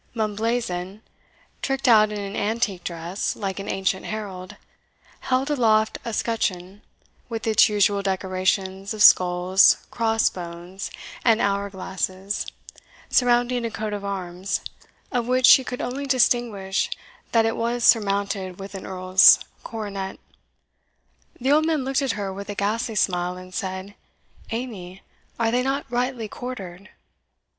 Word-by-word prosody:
Mumblazen, 215 Hz, -3 st, -2 dB, 0.6 s
tricked 270 Hz, -1 st, -1 dB
out 215 Hz, -3 st, +6 dB
in 210 Hz, -, -4 dB
an 200 Hz, 0 st, -5 dB
antique 205 Hz, -4 st, -1 dB
dress, 170 Hz, +3 st, -3 dB
like 195 Hz, -2 st, -4 dB
an 195 Hz, -, -6 dB
ancient 190 Hz, 0 st, -1 dB
herald, 195 Hz, -4 st, -6 dB, 0.6 s
held 260 Hz, +3 st, 0 dB
aloft 220 Hz, -5 st, +2 dB
a 230 Hz, -, -4 dB
scutcheon, 205 Hz, -4 st, -2 dB, 0.5 s
with 225 Hz, -1 st, -4 dB
its 220 Hz, -1 st, +5 dB
usual 205 Hz, -1 st, +2 dB
decorations 190 Hz, +1 st, -1 dB
of 210 Hz, -, +2 dB
skulls, 180 Hz, +1 st, +6 dB
cross 225 Hz, -1 st, +2 dB
bones, 175 Hz, +2 st, -7 dB, 0.3 s
and 225 Hz, -2 st, +4 dB
hour 200 Hz, 0 st, 0 dB
glasses, 190 Hz, +1 st, -3 dB, 0.6 s
surrounding 245 Hz, 0 st, +3 dB
a 230 Hz, -, -1 dB
coat 215 Hz, -1 st, -4 dB
of 205 Hz, -1 st, -4 dB
arms, 190 Hz, -1 st, -3 dB, 0.5 s
of 240 Hz, -1 st, -1 dB
which 255 Hz, 0 st, +3 dB
she 265 Hz, -, +8 dB
could 250 Hz, 0 st, -5 dB
only 275 Hz, +3 st, -4 dB
distinguish 235 Hz, -7 st, +1 dB, 0.4 s
that 225 Hz, -1 st, +4 dB
it 225 Hz, -, 0 dB
was 235 Hz, +1 st, -1 dB
surmounted 200 Hz, -4 st, +2 dB
with 195 Hz, +1 st, -8 dB
an 195 Hz, -, -7 dB
Earl's 185 Hz, +1 st, +6 dB, 0.3 s
coronet. 200 Hz, -4 st, -5 dB, 1.2 s
The 260 Hz, +3 st, +1 dB
old 310 Hz, +2 st, +4 dB
man 310 Hz, -5 st, 0 dB
looked 270 Hz, +1 st, 0 dB
at 270 Hz, -6 st, 0 dB
her 200 Hz, -2 st, -4 dB
with 200 Hz, +1 st, -8 dB
a 205 Hz, -, -4 dB
ghastly 220 Hz, +3 st, -1 dB
smile, 180 Hz, -2 st, 0 dB
and 185 Hz, 0 st, -11 dB
said, 190 Hz, +1 st, -4 dB, 0.6 s
"Amy, 205 Hz, -6 st, -6 dB, 0.4 s
are 225 Hz, -1 st, +2 dB
they 245 Hz, +1 st, +2 dB
not 270 Hz, +2 st, -1 dB
rightly 245 Hz, -2 st, -1 dB
quartered?" 200 Hz, -6 st, -8 dB
205 Hz, 135 wpm, -24 LUFS, 190-235 Hz, 1.2 s, she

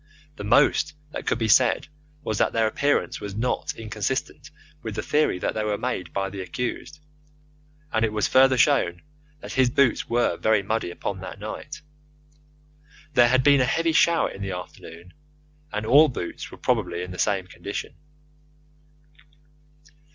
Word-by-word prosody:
The 105 Hz, -, -7 dB
most 150 Hz, +6 st, +3 dB, 0.2 s
that -, -, -7 dB
could -, -, +1 dB
be 115 Hz, -2 st, -1 dB
said 120 Hz, +3 st, +4 dB, 0.4 s
was 110 Hz, -7 st, -2 dB
that -, -, +2 dB
their 115 Hz, -1 st, +2 dB
appearance 140 Hz, +6 st, 0 dB
was 100 Hz, -1 st, -6 dB
not 125 Hz, +3 st, -2 dB
inconsistent 110 Hz, +3 st, -4 dB, 0.3 s
with -, -, -6 dB
the -, -, -3 dB
theory 150 Hz, -10 st, +1 dB
that -, -, -2 dB
they 110 Hz, -, -2 dB
were 105 Hz, -1 st, -1 dB
made 95 Hz, -9 st, -3 dB
by 95 Hz, -1 st, -2 dB
the 100 Hz, -1 st, -6 dB
accused, 125 Hz, +8 st, -5 dB, 0.9 s
and 110 Hz, 0 st, +2 dB
it 110 Hz, -, +1 dB
was 105 Hz, 0 st, 0 dB
further 130 Hz, 0 st, +5 dB
shown 105 Hz, -, +2 dB, 0.4 s
that -, -, -8 dB
his 130 Hz, -2 st, +3 dB
boots 130 Hz, 0 st, +2 dB
were 120 Hz, +1 st, +1 dB
very 110 Hz, -2 st, +2 dB
muddy 110 Hz, -2 st, -2 dB
upon 95 Hz, +2 st, -5 dB
that 95 Hz, +1 st, -8 dB
night. 145 Hz, +9 st, -7 dB, 1.3 s
There 120 Hz, -2 st, +6 dB
had 130 Hz, +1 st, +3 dB
been 140 Hz, -1 st, +5 dB
a -, -, +3 dB
heavy 165 Hz, +5 st, +1 dB
shower 170 Hz, +1 st, +3 dB
in 100 Hz, -, -10 dB
the 95 Hz, -1 st, -3 dB
afternoon, 90 Hz, -1 st, -10 dB, 0.6 s
and 105 Hz, +1 st, -3 dB
all 145 Hz, +7 st, +7 dB
boots 100 Hz, -, -6 dB
were -, -, -12 dB
probably 90 Hz, -, -1 dB
in 90 Hz, -, -7 dB
the 90 Hz, -, -8 dB
same 100 Hz, -3 st, +1 dB
condition. 100 Hz, +3 st, -6 dB
110 Hz, 165 wpm, -24 LUFS, 100-130 Hz, 1.3 s, all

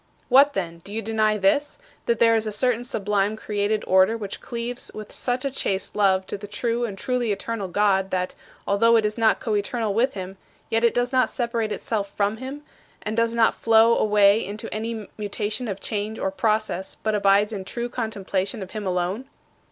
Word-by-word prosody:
"What 280 Hz, +3 st, +6 dB
then? 170 Hz, -3 st, -3 dB
Do 195 Hz, -, -12 dB
you 225 Hz, -, -2 dB
deny 215 Hz, -1 st, +1 dB
this: 210 Hz, +9 st, +1 dB, 0.3 s
that 235 Hz, -, +2 dB
there 230 Hz, +1 st, +5 dB
is 220 Hz, -1 st, 0 dB
a -, -, -2 dB
certain 245 Hz, +2 st, +1 dB
sublime 210 Hz, -3 st, 0 dB
created 210 Hz, 0 st, -1 dB
order 190 Hz, +4 st, +4 dB
which 205 Hz, -3 st, -6 dB
cleaves 235 Hz, +1 st, -5 dB
with 215 Hz, -1 st, -8 dB
such 250 Hz, +1 st, -1 dB
a 275 Hz, -, 0 dB
chaste 195 Hz, -7 st, -2 dB
love 190 Hz, -2 st, +3 dB
to -, -, -5 dB
the 205 Hz, -, -8 dB
true 235 Hz, +3 st, -1 dB
and 200 Hz, -4 st, -6 dB
truly 245 Hz, 0 st, -1 dB
eternal 205 Hz, 0 st, -3 dB
God 195 Hz, 0 st, +2 dB
that, 185 Hz, -1 st, -1 dB, 0.3 s
although 230 Hz, +4 st, +4 dB
it 220 Hz, -2 st, +3 dB
is 210 Hz, 0 st, -1 dB
not 225 Hz, -2 st, +3 dB
coeternal 215 Hz, 0 st, -1 dB
with 240 Hz, +4 st, +1 dB
him, 190 Hz, 0 st, -6 dB, 0.3 s
yet 225 Hz, +1 st, +2 dB
it 235 Hz, -, +3 dB
does 245 Hz, +1 st, +1 dB
not 255 Hz, -3 st, +3 dB
separate 235 Hz, -3 st, -2 dB
itself 205 Hz, -3 st, -2 dB
from 205 Hz, +1 st, +1 dB
him, 270 Hz, +4 st, -7 dB, 0.4 s
and 215 Hz, +1 st, -3 dB
does 230 Hz, 0 st, +1 dB
not 225 Hz, -1 st, +4 dB
flow 225 Hz, +1 st, +4 dB
away 210 Hz, 0 st, +4 dB
into 205 Hz, +3 st, -6 dB
any 220 Hz, -1 st, -4 dB
mutation 210 Hz, +3 st, -3 dB
of 200 Hz, -2 st, -4 dB
change 210 Hz, +2 st, -3 dB
or 190 Hz, -, -1 dB
process 215 Hz, -2 st, -1 dB
but 215 Hz, -, +1 dB
abides 205 Hz, +1 st, +3 dB
in 195 Hz, -2 st, -4 dB
true 235 Hz, +5 st, -4 dB
contemplation 205 Hz, -3 st, -3 dB
of 185 Hz, -, -11 dB
him 210 Hz, -3 st, -4 dB
alone?" 180 Hz, +6 st, -1 dB
215 Hz, 195 wpm, -24 LUFS, 200-230 Hz, 0.4 s, What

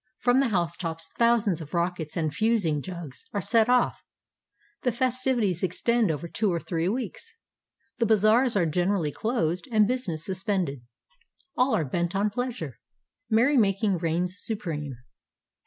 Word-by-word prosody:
From 245 Hz, +1 st, +3 dB
the 275 Hz, -, +3 dB
housetops 170 Hz, -3 st, -2 dB
thousands 230 Hz, -7 st, +3 dB
of 160 Hz, +3 st, -7 dB
rockets 170 Hz, -2 st, -2 dB
and 155 Hz, -3 st, -1 dB
"fusing 195 Hz, -7 st, +1 dB
jugs" 170 Hz, -6 st, -8 dB
are 205 Hz, -, 0 dB
set 225 Hz, +3 st, +3 dB
off. 250 Hz, -1 st, +2 dB, 0.8 s
The 250 Hz, -, +1 dB
festi\dties 245 Hz, -6 st, 0 dB
extend 225 Hz, +4 st, +1 dB
over 160 Hz, +2 st, -2 dB
two 210 Hz, +3 st, 0 dB
or 170 Hz, -, 0 dB
three 170 Hz, +1 st, -1 dB
weeks. 455 Hz, -, -5 dB, 0.6 s
The 230 Hz, -, +2 dB
bazaars 220 Hz, +3 st, +4 dB
are 185 Hz, -4 st, +3 dB
generally 175 Hz, 0 st, 0 dB
closed 180 Hz, -, -1 dB
and 215 Hz, -2 st, +4 dB
business 190 Hz, -11 st, -2 dB
suspended. 185 Hz, -, -2 dB, 0.7 s
All 250 Hz, -1 st, +3 dB
are 160 Hz, -, 0 dB
bent 170 Hz, +6 st, -2 dB
on 205 Hz, +2 st, +1 dB
pleasure. 225 Hz, -, -4 dB, 0.5 s
Merrymaking 220 Hz, -, +3 dB
reigns 175 Hz, +3 st, -1 dB
supreme. 150 Hz, -, -4 dB
195 Hz, 140 wpm, -26 LUFS, 165-235 Hz, 0.8 s, bazaars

